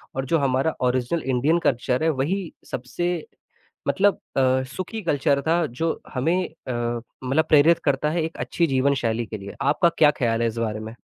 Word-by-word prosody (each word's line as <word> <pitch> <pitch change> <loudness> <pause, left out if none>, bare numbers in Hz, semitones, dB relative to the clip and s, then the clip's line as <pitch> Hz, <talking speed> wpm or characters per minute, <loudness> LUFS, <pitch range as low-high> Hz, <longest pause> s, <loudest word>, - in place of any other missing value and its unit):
और 135 - -2
जो - - +6
हमारा 135 +3 +1
ओरिजिनल 130 +6 -1
इंडियन 135 +6 +2
कल्चर 125 +2 0
है, 160 - +3
वही 160 +6 -1 0.2
सबसे 175 +9 -2 0.7
मतलब 200 +1 +2 0.2
अ, 130 0 +3
सुखी 215 +4 -4
कल्चर 140 -3 +1
था, 170 0 +3
जो 160 +7 -2
हमें 160 +8 +1 0.3
अ, - - -2 0.5
मतलब 140 +5 +2
प्रेरित 155 +3 +6
करता 140 +1 +1
है 165 0 0
एक 160 - -5
अच्छी 170 -1 0
जीवन 135 +1 +2
शैली 115 +1 0
के 110 0 -6
लिए, 100 0 -9
आपका 150 +5 +3
क्या 150 -2 +6
ख्याल 115 -1 +1
है 115 - +2
इस 115 +1 -4
बारे 110 -2 -2
में? 110 +2 -8
140 Hz, 185 wpm, -24 LUFS, 125-165 Hz, 0.7 s, जो